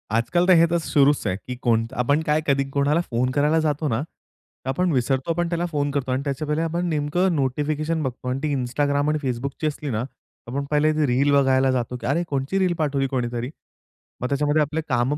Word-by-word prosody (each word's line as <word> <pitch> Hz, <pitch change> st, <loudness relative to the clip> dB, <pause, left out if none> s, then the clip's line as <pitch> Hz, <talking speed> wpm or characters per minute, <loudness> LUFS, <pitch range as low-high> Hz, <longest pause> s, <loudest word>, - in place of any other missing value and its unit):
आजकाल 175 Hz, +10 st, +1 dB
तर 185 Hz, -, +7 dB
हे 165 Hz, 0 st, +6 dB
तर 170 Hz, -, +3 dB
सुरूच 145 Hz, -3 st, +2 dB
आहे, 90 Hz, -, 0 dB
की 125 Hz, +5 st, -7 dB
कोणता 115 Hz, -1 st, 0 dB
आपण 145 Hz, +5 st, +2 dB
काय 150 Hz, +1 st, +2 dB
कधी 140 Hz, -1 st, +3 dB
कोणाला 145 Hz, +4 st, +1 dB
फोन 125 Hz, +2 st, +1 dB
करायला 150 Hz, +4 st, +2 dB
जातो 150 Hz, 0 st, 0 dB
ना, 115 Hz, -1 st, 0 dB
तर 130 Hz, -, -14 dB
आपण 180 Hz, +7 st, +1 dB
विसरतो 135 Hz, +3 st, 0 dB
पण 175 Hz, 0 st, -1 dB
त्याला 170 Hz, 0 st, -1 dB
फोन 145 Hz, -1 st, 0 dB
करतो 135 Hz, -2 st, -2 dB
आणि 130 Hz, +2 st, 0 dB
त्याच्या 140 Hz, +1 st, -3 dB
पहिले 150 Hz, +2 st, 0 dB
आपण 170 Hz, +2 st, -1 dB
नेमकं 160 Hz, +4 st, +1 dB
नोटिफिकेशन 150 Hz, +3 st, -1 dB
बघतो 125 Hz, -1 st, -5 dB
आणि 130 Hz, +1 st, -1 dB
ती 150 Hz, -2 st, 0 dB
Instagram 140 Hz, +3 st, 0 dB
आणि 155 Hz, -, 0 dB
Facebookची 135 Hz, +5 st, -3 dB
असली 150 Hz, -1 st, -4 dB
ना, 110 Hz, -3 st, -1 dB, 0.5 s
आपण 140 Hz, +4 st, -3 dB
पहिले 150 Hz, +1 st, +3 dB
रील 135 Hz, +3 st, +2 dB
बघायला 135 Hz, -1 st, +4 dB
जातो, 125 Hz, 0 st, -2 dB
की 120 Hz, -, -6 dB
अरे, 155 Hz, +6 st, +1 dB
कोणची 140 Hz, +7 st, -1 dB
रील 185 Hz, -2 st, +2 dB
पाठवली 140 Hz, -3 st, 0 dB
कोणीतरी. 125 Hz, -1 st, -2 dB, 0.7 s
मग 125 Hz, -, 0 dB
त्याच्यामध्ये 145 Hz, +2 st, +2 dB
आपले 150 Hz, +2 st, -1 dB
कामं 125 Hz, +3 st, +1 dB
145 Hz, 205 wpm, -23 LUFS, 130-155 Hz, 0.7 s, तर